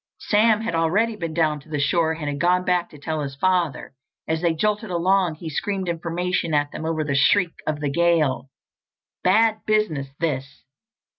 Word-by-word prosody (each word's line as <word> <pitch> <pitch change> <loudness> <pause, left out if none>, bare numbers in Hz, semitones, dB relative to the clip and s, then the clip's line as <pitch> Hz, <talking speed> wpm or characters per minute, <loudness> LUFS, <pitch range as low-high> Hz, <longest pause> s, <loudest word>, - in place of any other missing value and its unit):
Sam 215 +1 +3
had 225 - -3
already 195 +8 +1
been 165 -6 -5
down 155 -3 +1
to 145 - -19
the 150 - -2
shore 160 +2 +1
and 160 -2 -6
had 145 0 -3
gone 180 +2 +2
back 180 -1 +1
to 150 - -14
tell 155 +1 -3
his 140 -1 -5
father. 175 -3 0 0.3
As 160 0 -1
they 170 -1 +2
jolted 210 +5 -1
along, 180 -1 +1
he 160 +2 -9
screamed 190 +5 -2
information 170 0 -1
at 145 0 +1
them 160 - -5
over 160 -1 -1
the 145 -2 -2
shriek 170 +5 +3
of 150 -1 -2
the 145 -2 -1
gale. 155 -5 +1 0.7
"Bad 220 +3 +3
business, 215 -11 +1
this! 140 -4 -3
165 Hz, 180 wpm, -23 LUFS, 150-185 Hz, 0.7 s, Sam